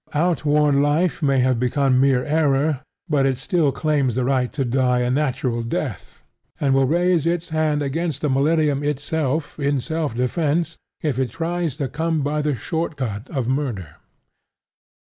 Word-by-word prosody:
Outworn 150 Hz, -3 st, +2 dB
life 150 Hz, +2 st, +1 dB
may 135 Hz, -3 st, +3 dB
have 130 Hz, -2 st, +2 dB
become 130 Hz, +1 st, +2 dB
mere 130 Hz, -2 st, +3 dB
error; 150 Hz, -2 st, +1 dB, 0.3 s
but 145 Hz, -4 st, +2 dB
it 130 Hz, -2 st, 0 dB
still 155 Hz, -, +1 dB
claims 140 Hz, -3 st, 0 dB
the 125 Hz, -1 st, 0 dB
right 130 Hz, -2 st, +1 dB
to 135 Hz, -3 st, -2 dB
die 125 Hz, 0 st, +1 dB
a 125 Hz, 0 st, 0 dB
natural 130 Hz, -4 st, 0 dB
death, 115 Hz, -, -5 dB, 0.4 s
and 140 Hz, -2 st, +2 dB
will 135 Hz, -1 st, +3 dB
raise 170 Hz, +1 st, +2 dB
its 170 Hz, 0 st, -1 dB
hand 155 Hz, -2 st, +1 dB
against 150 Hz, +1 st, -2 dB
the 150 Hz, -, +1 dB
millennium 145 Hz, +1 st, +2 dB
itself 150 Hz, +1 st, -2 dB
in 140 Hz, -1 st, +1 dB
self 155 Hz, -2 st, -3 dB
defence 155 Hz, +6 st, 0 dB, 0.3 s
if 145 Hz, -5 st, 0 dB
it 130 Hz, -2 st, 0 dB
tries 170 Hz, +1 st, -2 dB
to 145 Hz, -3 st, -2 dB
come 160 Hz, +1 st, -1 dB
by 150 Hz, +2 st, 0 dB
the 150 Hz, -2 st, 0 dB
short 160 Hz, +8 st, -3 dB
cut 110 Hz, -2 st, -4 dB
of 130 Hz, -7 st, -2 dB
murder. 120 Hz, -, -3 dB
145 Hz, 165 wpm, -22 LUFS, 130-155 Hz, 0.4 s, may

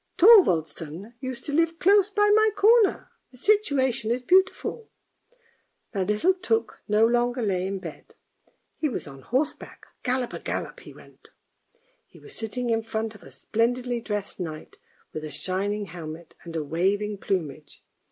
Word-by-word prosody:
' -, -, -47 dB
Thorvaldsen 180 Hz, -, +4 dB
used 255 Hz, -2 st, -6 dB
to 290 Hz, -, -4 dB
live 330 Hz, +2 st, +2 dB
close 395 Hz, +2 st, +4 dB
by 415 Hz, 0 st, +3 dB
my 435 Hz, +1 st, +5 dB
corner; 430 Hz, +1 st, +4 dB, 0.2 s
the 250 Hz, -, -16 dB
situation 265 Hz, -, +2 dB
is 245 Hz, +2 st, -1 dB
beautiful." 380 Hz, -, +1 dB, 1.0 s
Now 195 Hz, -, -1 dB
little 210 Hz, -, +2 dB
Tuk 375 Hz, +5 st, -1 dB
no 210 Hz, +2 st, +4 dB
longer 240 Hz, +1 st, +1 dB
lay 190 Hz, -3 st, 0 dB
in 195 Hz, 0 st, -3 dB
bed, 170 Hz, -5 st, -10 dB, 0.6 s
he 305 Hz, -, 0 dB
was 250 Hz, -, -4 dB
on 135 Hz, -2 st, -11 dB
horseback. 260 Hz, -, -3 dB, 0.2 s
Gallop 250 Hz, -1 st, -1 dB
a -, -, -5 dB
gallop -, -, -4 dB
he -, -, -12 dB
went. -, -, -18 dB, 0.8 s
He -, -, -19 dB
was 425 Hz, -, -11 dB
sitting 235 Hz, +2 st, -3 dB
in 225 Hz, 0 st, +1 dB
front 220 Hz, 0 st, -3 dB
of 210 Hz, -, -15 dB
a -, -, -13 dB
splendidly 235 Hz, -, -1 dB
dressed 210 Hz, -4 st, -4 dB
knight 155 Hz, -3 st, -7 dB, 0.3 s
with 155 Hz, -, -5 dB
a 155 Hz, -, -5 dB
shining 190 Hz, +7 st, -2 dB
helmet 165 Hz, -2 st, -9 dB
and 165 Hz, -1 st, -9 dB
a 160 Hz, -, -1 dB
waving 195 Hz, +7 st, -1 dB
plume. 180 Hz, -9 st, -1 dB
225 Hz, 160 wpm, -25 LUFS, 185-305 Hz, 1.0 s, my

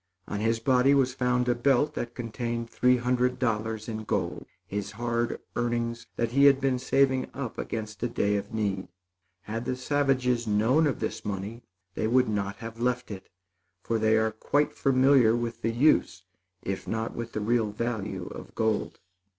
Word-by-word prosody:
On 100 Hz, -, -3 dB
his 115 Hz, +1 st, +1 dB
body 130 Hz, +3 st, +4 dB
was 130 Hz, -2 st, +2 dB
found 125 Hz, -1 st, +1 dB
a 120 Hz, -, +4 dB
belt 135 Hz, +4 st, +2 dB
that 120 Hz, -3 st, -5 dB
contained 115 Hz, 0 st, -3 dB
three 125 Hz, 0 st, +3 dB
hundred 125 Hz, +1 st, +1 dB
dollars 110 Hz, -3 st, -1 dB
in 110 Hz, -1 st, -4 dB
gold -, -, -2 dB, 0.2 s
his 100 Hz, 0 st, -4 dB
hard 115 Hz, +1 st, -1 dB, 0.2 s
earnings 120 Hz, 0 st, -2 dB
that 115 Hz, -1 st, -1 dB
he 140 Hz, +3 st, +5 dB
had 140 Hz, -1 st, +6 dB
been 135 Hz, -2 st, +1 dB
saving 130 Hz, 0 st, +2 dB
up 130 Hz, -4 st, -5 dB
against 110 Hz, -2 st, -5 dB
a 120 Hz, -, +1 dB
day 105 Hz, -3 st, 0 dB
of 100 Hz, 0 st, -3 dB
need. 100 Hz, -3 st, -2 dB, 0.6 s
Had 115 Hz, +3 st, -4 dB
the 130 Hz, 0 st, -1 dB
savages 130 Hz, -3 st, +1 dB
known 115 Hz, +9 st, +3 dB
of 140 Hz, -, -2 dB
this 110 Hz, -, -3 dB
money, 105 Hz, +3 st, -4 dB, 0.3 s
they 110 Hz, -, -1 dB
would 125 Hz, +2 st, +3 dB
not 100 Hz, -1 st, -2 dB
have 115 Hz, 0 st, -9 dB
left 125 Hz, 0 st, -1 dB
it, 95 Hz, -2 st, -8 dB, 0.5 s
for 115 Hz, -1 st, 0 dB
they 110 Hz, 0 st, +3 dB
are 110 Hz, 0 st, +2 dB
quite 145 Hz, +7 st, 0 dB
familiar 130 Hz, -3 st, +4 dB
with 115 Hz, -1 st, -3 dB
the 115 Hz, -, 0 dB
use, 115 Hz, -6 st, +2 dB, 0.4 s
if 95 Hz, 0 st, -4 dB
not 110 Hz, 0 st, -2 dB
with 115 Hz, 0 st, -6 dB
the -, -, -2 dB
real 110 Hz, 0 st, +1 dB
value 110 Hz, -2 st, -3 dB
of -, -, -10 dB
gold. 110 Hz, -2 st, 0 dB
115 Hz, 175 wpm, -27 LUFS, 110-125 Hz, 0.6 s, had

